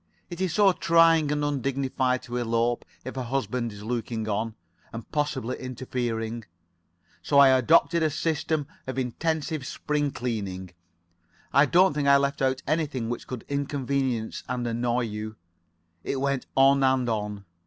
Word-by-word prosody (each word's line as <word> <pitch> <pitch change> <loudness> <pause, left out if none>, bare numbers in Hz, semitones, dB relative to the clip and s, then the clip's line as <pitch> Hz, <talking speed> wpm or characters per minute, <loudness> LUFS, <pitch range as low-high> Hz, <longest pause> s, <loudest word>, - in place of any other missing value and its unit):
It 175 +1 -6
is 185 -3 0
so 205 -2 +6
trying 165 -3 +4
and 145 0 0
undignified 135 -2 0
to 120 0 -5
elope 115 0 0 0.2
if 130 - -6
a 130 - -2
husband 120 -2 -2
is 105 0 -10
looking 115 -1 -3
on, 110 +1 -2 0.4
and 115 0 -7
possibly 145 -5 -2
interfering. 120 -3 -3 0.8
So 145 - +1
I 140 -1 +9
adopted 160 +6 +4
a 160 - +3
system 155 0 -1 0.2
of 130 - -4
intensive 155 +4 -2
spring 150 -1 -1
cleaning. 100 -8 -4 0.8
I 140 +1 +6
don't 180 +3 +4
think 145 -1 -1
I 140 0 +7
left 140 0 -1
out 130 +1 +1
anything 145 -7 -1
which 120 - -5
could 125 -3 -6
inconvenience 140 -4 -2
and 125 -1 -2
annoy 120 +1 0
you. 110 -1 -5 0.7
It 135 - -2
went 140 -1 -1
on 135 +1 +6
and 130 -2 +2
on. 105 -3 -3
130 Hz, 150 wpm, -26 LUFS, 115-145 Hz, 0.8 s, I